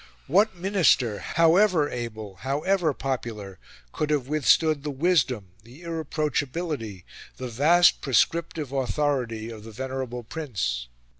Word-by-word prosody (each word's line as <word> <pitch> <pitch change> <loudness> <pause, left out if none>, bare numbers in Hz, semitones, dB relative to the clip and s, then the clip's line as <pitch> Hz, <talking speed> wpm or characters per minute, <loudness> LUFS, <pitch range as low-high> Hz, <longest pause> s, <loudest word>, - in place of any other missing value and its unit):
What 200 +7 +3
Minister, 170 - +2
however 170 -1 +3
able, 110 -6 -6
however 155 +5 0
popular, 115 -8 -5 0.3
could 150 - -2
have 145 -4 0
withstood 155 +1 +3
the 150 - -4
wisdom, 135 - +1
the 125 +9 -15
irreproachability, 150 - -3 0.3
the 130 - -5
vast 160 +9 +4
prescriptive 155 +2 0
authority, 125 -3 -1
of 110 -2 -10
the 115 - -10
venerable 130 0 -5
Prince? 95 - -3
135 Hz, 115 wpm, -25 LUFS, 115-160 Hz, 0.3 s, vast